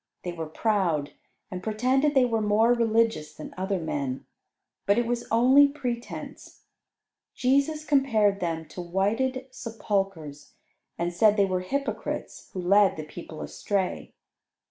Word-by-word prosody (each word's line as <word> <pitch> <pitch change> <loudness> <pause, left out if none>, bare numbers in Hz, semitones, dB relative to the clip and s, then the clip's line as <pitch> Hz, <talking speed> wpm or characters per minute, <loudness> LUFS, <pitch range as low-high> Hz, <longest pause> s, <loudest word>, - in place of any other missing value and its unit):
They 175 - -3
were 165 -2 -5
proud, 165 -5 0 0.4
and 180 -1 -5
pretended 255 +8 +1
they 260 -2 +5
were 225 -2 0
more 215 +3 +4
religious 225 -9 +1
than 155 - -9
other 190 +1 -1
men, 140 -5 -3 0.6
but 200 - +4
it 240 - +2
was 235 0 -2
only 260 +5 +6
pretense. 245 -4 -6 0.7
Jesus 280 +4 +1
compared 225 -9 +2
them 165 -3 -2
to 180 - -7
whited 220 +9 -1
sepulchres, 195 - -4 0.4
and 175 +1 -2
said 210 +4 +4
they 200 - +5
were 185 -1 -1
hypocrites, 275 +10 -4
who 185 - -4
led 200 +1 +4
the 155 - -4
people 160 0 -9
astray. 195 -3 -3
210 Hz, 135 wpm, -26 LUFS, 175-245 Hz, 0.7 s, only